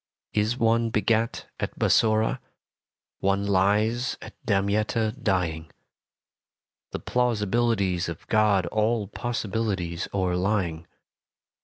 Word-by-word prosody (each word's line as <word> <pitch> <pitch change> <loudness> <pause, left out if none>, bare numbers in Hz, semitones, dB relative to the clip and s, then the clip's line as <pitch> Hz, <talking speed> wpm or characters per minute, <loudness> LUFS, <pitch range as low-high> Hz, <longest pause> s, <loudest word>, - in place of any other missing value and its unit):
Is 110 +3 +1
one 115 0 +2
begat 110 +1 0
at - - -4
Bassora, 110 0 +3 0.8
One 100 +1 +1
lies 105 +5 +1
at - - -10
Damietta 110 +1 +1
dying 80 -6 -1 1.2
The - - -4
plausibilities 110 -6 0
of 85 - -7
God 105 -4 +3
All 110 +3 0
possibles 115 0 -2 0.4
o'erlying. 90 -3 -1
105 Hz, 90 wpm, -26 LUFS, 95-115 Hz, 1.2 s, Bassora